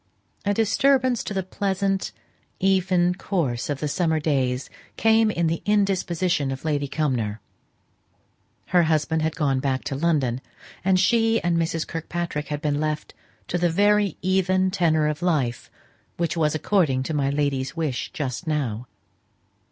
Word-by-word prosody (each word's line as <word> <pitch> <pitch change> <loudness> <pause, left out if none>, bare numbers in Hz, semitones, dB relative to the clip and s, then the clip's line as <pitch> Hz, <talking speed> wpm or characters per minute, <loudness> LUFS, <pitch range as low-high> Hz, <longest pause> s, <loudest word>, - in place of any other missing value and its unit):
A 205 - +2
disturbance 255 +2 +2
to - - -4
the 190 -1 -1
pleasant, 195 +1 -1 0.5
even 185 -2 +2
course 165 - -2
of 145 -2 -2
the 150 - -2
summer 160 0 +1
days 135 -4 0 0.3
came 225 0 +4
in 170 -5 0
the 165 0 0
indisposition 185 -7 +1
of 135 +3 -5
Lady 145 -2 0
Cumnor. 125 -9 -1 1.3
Her 180 - +5
husband 160 -1 +1
had 160 0 -1
gone 140 -4 +1
back 130 -1 -1
to 135 - -3
London, 135 -5 0 0.4
and 185 0 +3
she 225 +4 +3
and 175 -1 +1
Mrs. 165 -1 0
Kirkpatrick 165 -2 -4
had 150 +1 -4
been 145 -1 0
left 155 0 -2 0.3
to 175 - -1
the 175 0 +2
very 205 +1 +2
even 185 0 +2
tenor 160 -5 +2
of 150 0 -2
life, 145 -10 0 0.5
which 170 -2 -1
was 155 -2 +1
according 155 -7 +1
to 160 - -4
my 140 -2 +1
lady's 140 0 -1
wish 150 -6 -2
just 140 +3 -4
now. 125 -7 -2
165 Hz, 150 wpm, -24 LUFS, 145-185 Hz, 1.3 s, Her